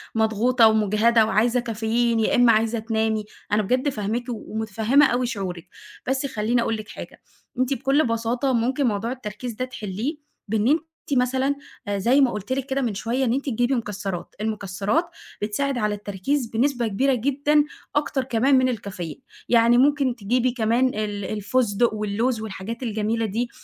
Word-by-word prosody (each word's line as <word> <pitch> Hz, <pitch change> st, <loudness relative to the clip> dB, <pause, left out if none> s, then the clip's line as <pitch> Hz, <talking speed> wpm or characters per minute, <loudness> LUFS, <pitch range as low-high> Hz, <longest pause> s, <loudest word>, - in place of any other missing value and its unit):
مضغوطة 225 Hz, +2 st, +4 dB
ومُجهدة 220 Hz, +1 st, +3 dB
وعايزة 230 Hz, +3 st, +2 dB
كافيين 230 Hz, 0 st, 0 dB
يا 220 Hz, -, +2 dB
إمّا 245 Hz, -1 st, +6 dB
عايزة 225 Hz, +1 st, +1 dB
تنامي، 220 Hz, -1 st, -1 dB, 0.3 s
أنا 210 Hz, +1 st, +3 dB
بجد 255 Hz, +7 st, +1 dB
فاهماكِ 225 Hz, 0 st, -2 dB
ومُتفهّمة 220 Hz, +4 st, +1 dB
أوي 250 Hz, 0 st, +1 dB
شعورِك، 185 Hz, -7 st, -5 dB, 0.4 s
بس 265 Hz, +2 st, 0 dB
خلّيني 235 Hz, -1 st, 0 dB
أقول 225 Hz, -, 0 dB
لِك 215 Hz, 0 st, -9 dB
حاجة، -, -, -10 dB, 0.4 s
أنتِ 255 Hz, +2 st, +2 dB
بكُلّ 275 Hz, +2 st, +2 dB
بساطة 235 Hz, +4 st, 0 dB
ممكن 255 Hz, +3 st, +1 dB
موضوع 220 Hz, +2 st, -1 dB
التركيز 235 Hz, -1 st, -6 dB
ده 255 Hz, +4 st, -3 dB
تِحلّيه، 240 Hz, -, -4 dB, 0.3 s
بإن 215 Hz, +2 st, +1 dB
أنتِ 310 Hz, +3 st, +3 dB, 0.4 s
مثلًا، 260 Hz, +3 st, +1 dB, 0.3 s
آآ، 205 Hz, -, -1 dB
زي 245 Hz, +8 st, +3 dB
ما 260 Hz, -3 st, +4 dB
قُلت 210 Hz, +4 st, -3 dB
لِك 265 Hz, -1 st, -2 dB
كده 270 Hz, 0 st, -1 dB
من 230 Hz, -5 st, -1 dB
شويّة 240 Hz, +6 st, -1 dB
إن 235 Hz, -, +1 dB
أنتِ 275 Hz, +2 st, -2 dB
تجيبي 245 Hz, +3 st, +1 dB
مكسّرات، 200 Hz, -5 st, -4 dB
المكسّرات، 210 Hz, -, -1 dB, 0.4 s
بتساعد 255 Hz, +6 st, -1 dB
على 210 Hz, -2 st, 0 dB
التركيز 205 Hz, +7 st, -2 dB
بنسبة 240 Hz, +1 st, 0 dB
كبيرة 265 Hz, +7 st, +1 dB
جدًا، 280 Hz, +4 st, +2 dB, 0.3 s
أكتر 290 Hz, -2 st, 0 dB
كمان 260 Hz, +2 st, +3 dB
من 255 Hz, 0 st, +3 dB
الكافيين، 190 Hz, -, -5 dB, 0.3 s
يعني 235 Hz, 0 st, +5 dB
ممكن 275 Hz, -1 st, +3 dB
تجيبي 245 Hz, +3 st, +1 dB
كمان 235 Hz, +2 st, +2 dB
ال 210 Hz, -4 st, -3 dB
الفستق 215 Hz, +2 st, +1 dB
واللوز 215 Hz, +3 st, -1 dB
والحاجات 220 Hz, +3 st, -6 dB
الجميلة 225 Hz, 0 st, -1 dB
دي، 230 Hz, +4 st, -2 dB
230 Hz, 160 wpm, -23 LUFS, 215-255 Hz, 0.4 s, إمّا